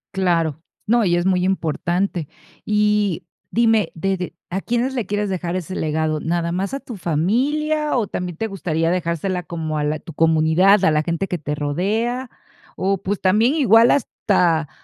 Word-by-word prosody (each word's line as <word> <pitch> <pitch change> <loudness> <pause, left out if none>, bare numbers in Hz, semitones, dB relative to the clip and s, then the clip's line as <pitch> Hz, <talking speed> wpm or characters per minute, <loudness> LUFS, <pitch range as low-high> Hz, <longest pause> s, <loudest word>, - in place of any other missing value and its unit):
Claro. 165 -5 +1 0.3
No, 235 0 +3
y 175 -2 +2
es 175 - -1
muy 185 -1 +2
importante. 175 -1 -1 0.3
Y 210 -3 +1 0.3
dime, 225 -2 +2
¿de 190 +4 0
de 180 -1 -5 0.2
a 190 +3 -2
quiénes 240 +4 -1
le 240 -6 -2
quieres 205 +1 -1
dejar 180 -1 -2
ese 185 +1 -5
legado? 155 0 -1
¿Nada 170 0 -1
más 195 +6 -2
a 275 - -2
tu 245 - -9
familia 270 - 0
o 225 -4 0
también 180 -3 -5
te 225 - -2
gustaría 165 -5 -1
dejársela 180 +1 -1
como 160 -2 -4
a 150 - -1
la 150 +1 -1
tu 165 - -11
comunidad, 165 +5 +4
a 195 - +4
la 150 0 +2
gente 170 +4 -2
que 180 - -2
te 150 -1 -4
rodea? 215 - -1 0.5
O, 195 0 0
pues, 200 +1 -2
también 220 +9 +3
igual 235 -4 +5
hasta 175 - +1
185 Hz, 175 wpm, -21 LUFS, 165-210 Hz, 0.5 s, igual